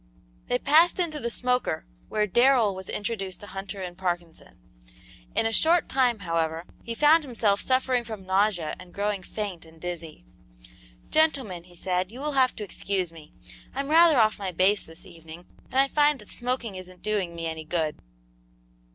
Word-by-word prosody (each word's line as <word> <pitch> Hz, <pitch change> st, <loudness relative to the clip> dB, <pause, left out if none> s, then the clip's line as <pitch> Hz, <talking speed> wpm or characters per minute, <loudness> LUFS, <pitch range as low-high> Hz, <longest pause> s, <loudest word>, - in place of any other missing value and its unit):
They 245 Hz, -, +2 dB
passed 310 Hz, +7 st, +5 dB
into 330 Hz, -5 st, 0 dB
the 235 Hz, -, -2 dB
smoker, 250 Hz, -, -1 dB, 0.2 s
where 215 Hz, -1 st, +1 dB
Darrell 240 Hz, 0 st, +4 dB
was 190 Hz, 0 st, -8 dB
introduced 205 Hz, -3 st, -4 dB
to -, -, -8 dB
Hunter 195 Hz, +1 st, -7 dB
and 175 Hz, -1 st, -6 dB
Parkinson. 175 Hz, -2 st, -4 dB, 0.8 s
In -, -, +2 dB
a 225 Hz, -, 0 dB
short 330 Hz, +7 st, +4 dB
time, 250 Hz, -3 st, +2 dB
however, 165 Hz, -1 st, -1 dB, 0.2 s
he 230 Hz, -, -5 dB
found 305 Hz, +5 st, +5 dB
himself 225 Hz, -6 st, +1 dB
suffering 255 Hz, -1 st, +1 dB
from 215 Hz, -4 st, -8 dB
nausea 190 Hz, -4 st, +1 dB
and 180 Hz, -1 st, -13 dB
growing 205 Hz, -1 st, -1 dB
faint 195 Hz, -2 st, -5 dB
and 160 Hz, 0 st, -16 dB
dizzy. 170 Hz, -, -6 dB, 0.9 s
"Gentlemen," 265 Hz, -, +1 dB
he 175 Hz, -1 st, -16 dB
said, 180 Hz, +2 st, -1 dB
"you 245 Hz, -, -10 dB
will 300 Hz, +2 st, -2 dB
have 260 Hz, -2 st, +3 dB
to 215 Hz, -, -5 dB
excuse 190 Hz, -3 st, -2 dB
me. 155 Hz, -2 st, -14 dB, 0.4 s
I'm 275 Hz, +1 st, -2 dB
rather 325 Hz, -1 st, +7 dB
off 215 Hz, -3 st, +3 dB
my 195 Hz, -2 st, -3 dB
base 190 Hz, +4 st, +3 dB
this 165 Hz, +1 st, -13 dB
evening, 165 Hz, 0 st, -12 dB, 0.2 s
and -, -, -14 dB
I 270 Hz, +1 st, +5 dB
find 295 Hz, +1 st, +3 dB
that 210 Hz, -, -15 dB
smoking 245 Hz, -3 st, -3 dB
isn't 185 Hz, -1 st, -10 dB
doing 200 Hz, -5 st, -1 dB
me 165 Hz, 0 st, -4 dB
any 160 Hz, -1 st, -4 dB
good." 155 Hz, -1 st, -2 dB
205 Hz, 175 wpm, -26 LUFS, 175-255 Hz, 0.9 s, rather